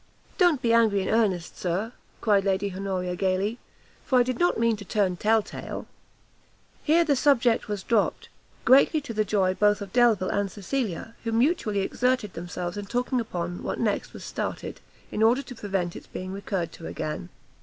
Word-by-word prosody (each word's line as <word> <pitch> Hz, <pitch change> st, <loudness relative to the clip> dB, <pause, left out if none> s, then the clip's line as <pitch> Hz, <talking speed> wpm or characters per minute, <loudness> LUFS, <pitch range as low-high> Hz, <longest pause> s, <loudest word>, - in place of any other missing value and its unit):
"Don't 345 Hz, -8 st, +4 dB
be 230 Hz, -1 st, +3 dB
angry 220 Hz, -4 st, +4 dB
in -, -, -3 dB
earnest, 200 Hz, -7 st, 0 dB
Sir," 190 Hz, +7 st, -2 dB, 0.3 s
cried 205 Hz, -3 st, +3 dB
Lady 195 Hz, 0 st, 0 dB
Honoria, 185 Hz, -2 st, -2 dB
gaily, 195 Hz, +5 st, 0 dB, 0.4 s
"for 260 Hz, -, +2 dB
I -, -, +6 dB
did 255 Hz, -1 st, -3 dB
not 350 Hz, -, +3 dB
mean 230 Hz, -1 st, +3 dB
to 205 Hz, -, -8 dB
turn 195 Hz, -2 st, 0 dB
tell 215 Hz, +4 st, +2 dB
tale." -, -, -7 dB, 1.0 s
Here 330 Hz, +2 st, +4 dB
the 290 Hz, -3 st, +3 dB
subject 250 Hz, -4 st, +3 dB
was 205 Hz, -3 st, -3 dB
dropt; 225 Hz, -4 st, +1 dB, 0.4 s
greatly 275 Hz, +5 st, +6 dB
to 285 Hz, -5 st, -7 dB
the 215 Hz, 0 st, +1 dB
joy 195 Hz, -3 st, +1 dB
both 205 Hz, +1 st, +3 dB
of 200 Hz, -2 st, -8 dB
Delvile 235 Hz, -6 st, +4 dB
and 200 Hz, -1 st, -1 dB
Cecilia, 220 Hz, 0 st, -3 dB
who 230 Hz, -, -2 dB
mutually 230 Hz, -, +1 dB
exerted 250 Hz, -1 st, 0 dB
themselves 175 Hz, +1 st, -5 dB
in 205 Hz, -1 st, -5 dB
talking 250 Hz, +3 st, 0 dB
upon 175 Hz, -6 st, -4 dB
what -, -, -3 dB
next 215 Hz, -3 st, -1 dB
was -, -, -10 dB
started, -, -, -4 dB, 0.3 s
in 210 Hz, -, -2 dB
order 240 Hz, +5 st, +4 dB
to 260 Hz, -, -9 dB
prevent 195 Hz, -6 st, -2 dB
its -, -, -10 dB
being 185 Hz, +1 st, -6 dB
recurred 195 Hz, -4 st, -3 dB
to 165 Hz, -, -9 dB
again. 150 Hz, -, -4 dB
210 Hz, 180 wpm, -26 LUFS, 190-240 Hz, 1.0 s, I